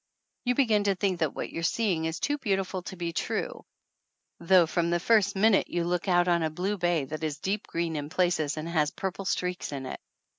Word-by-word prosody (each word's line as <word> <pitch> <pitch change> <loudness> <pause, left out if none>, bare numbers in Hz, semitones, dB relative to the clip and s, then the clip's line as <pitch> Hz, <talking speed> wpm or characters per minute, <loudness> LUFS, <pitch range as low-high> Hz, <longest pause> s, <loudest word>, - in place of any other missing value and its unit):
You 250 0 +2
begin 220 -6 +3
to 200 -1 +2
think 185 -2 0
that 160 -4 0
what - - -4
you're 165 - -4
seeing 180 -2 +1
is 160 +2 -2
too 290 0 -1
beautiful 195 -5 -1
to 190 - -8
be 170 -2 -4
true, - - -3 0.8
though, 175 +1 +5
from 170 +1 0
the 175 0 +1
first 205 +1 +3
minute 205 +1 +4
you 175 -1 -1
look 175 +2 -1
out 175 -1 +3
on 170 -1 +3
a 160 - +1
blue 185 +6 -2
bay 175 -5 +1
that 155 +3 -6
is 150 -2 -2
deep 195 +7 -2
green 165 -1 -2
in 145 -1 -4
places, 165 -4 +1
and 155 +1 -4
has 155 -3 +1
purple 190 +3 -5
streaks 180 -3 -2
in 135 -2 -5
it. - - -6
175 Hz, 220 wpm, -28 LUFS, 165-195 Hz, 0.8 s, though